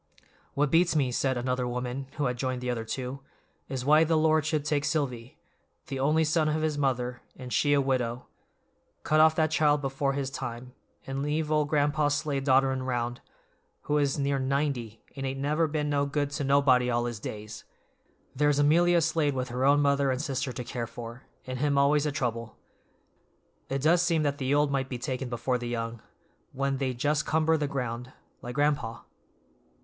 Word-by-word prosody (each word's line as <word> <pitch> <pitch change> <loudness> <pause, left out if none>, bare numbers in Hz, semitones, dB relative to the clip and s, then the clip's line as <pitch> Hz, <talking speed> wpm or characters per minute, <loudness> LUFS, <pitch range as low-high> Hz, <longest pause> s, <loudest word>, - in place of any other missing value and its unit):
"What 145 0 +1
beats 170 0 +3
me," 135 -4 +2
said 130 +1 0
another 125 0 -1
woman, 125 +2 -4
who 145 - 0
had 125 -1 0
joined 130 0 -3
the 125 0 -1
other 115 -2 -3
two, 130 +3 -4 0.5
"is 130 -2 -4
why 155 +2 +6
the 160 0 +2
Lord 155 -1 +3
should 155 -2 -1
take 150 -1 0
Silvy—'the 135 -1 -5
only 155 +4 +3
son 155 0 +2
of 155 +1 -1
his 155 -1 0
mother, 125 -3 -1
and 125 -1 -7
she 145 -1 +3
a 145 - +4
widow'—cut 130 +3 -4
off 160 0 +6
that 155 -1 +1
child 150 -1 +3
before 135 0 -1
his 135 -1 -3
time, 125 -1 -6 0.3
and 135 +1 -3
leave 150 +1 -1
old 150 -1 +2
Gran'pa 145 0 +2
Slade 140 -1 -1
dodderin' 130 -1 +3
'round, 120 -1 -2 0.6
who 150 0 0
is 140 -1 +1
near 140 -1 0
ninety 130 -5 -2
and 135 - -5
ain't 135 0 -3
never 150 +4 +1
been 150 -1 -2
no 140 -1 +1
good 145 0 -1
to 145 - -3
nobody 135 -3 +4
all 120 0 +1
his 120 -3 -4
days. 110 0 -7 0.7
There's 145 +1 +2
Amelia 170 +4 +4
Slade 155 -3 +1
with 130 0 -2
her 125 +2 -1
own 145 +1 +5
mother 140 -1 +2
and 130 -1 0
sister 135 -2 -2
to 125 0 -5
care 120 -1 -4
for, 115 +2 -9 0.2
an' 130 0 -5
him 140 +1 +1
always 145 +2 +3
a - - 0
trouble. 115 -5 -3 1.1
It 135 0 -2
does 170 +3 +4
seem 165 -3 +2
that 145 -1 -1
the 130 0 -1
old 145 -1 +2
might 135 -1 -1
be 125 - -4
taken 130 +1 -4
before 125 +1 -1
the 120 - -5
young, 115 -1 -4 0.5
when 135 0 -1
they 130 -2 -2
just 145 +4 0
cumber 160 +1 +2
the 150 -2 -1
ground, 125 -2 -4 0.3
like 120 0 -7
gran'pa." 145 -6 0
140 Hz, 185 wpm, -28 LUFS, 125-150 Hz, 1.1 s, why